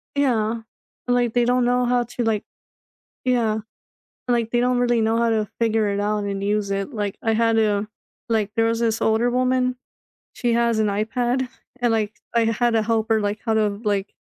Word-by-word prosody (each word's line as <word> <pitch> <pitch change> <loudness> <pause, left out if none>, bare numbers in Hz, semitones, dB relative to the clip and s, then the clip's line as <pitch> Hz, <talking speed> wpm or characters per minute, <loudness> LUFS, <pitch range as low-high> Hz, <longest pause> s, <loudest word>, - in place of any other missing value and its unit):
Yeah. 230 -5 +1 0.5
Like, 245 -2 +1
they 240 -1 +3
don't 250 0 +2
know 250 0 +2
how 245 0 +2
to, 240 0 -4
like 220 -2 0 0.8
yeah, 235 -4 +1 0.7
like, 235 -2 +1
they 240 - +2
don't 250 0 +2
really 240 -1 +2
know 225 +1 +2
how 235 0 +2
to 215 -2 0
figure 225 -2 +2
it 200 0 -1
out 210 0 -1
and 200 0 -3
use 205 -1 0
it. 195 +6 -2
Like 205 -2 -3
I 225 - +1
had 225 0 +2
a 210 -1 +1 0.4
like, 215 -3 0
there 225 0 +3
was 230 0 0
this 225 -1 0
older 225 +2 +2
woman, 255 0 +1 0.6
she 240 -2 0
has 235 -1 +2
an 215 - +2
iPad 245 +5 -1 0.3
and, 240 -2 +2
like, 215 -1 0 0.2
I 235 - +4
had 240 +2 +1
to 225 -1 +2
help 225 0 0
her, 220 -1 +3
like, 205 +1 -1
how 225 - +1
to, 210 -2 0
like, 205 -1 -1
225 Hz, 200 wpm, -22 LUFS, 215-240 Hz, 0.8 s, I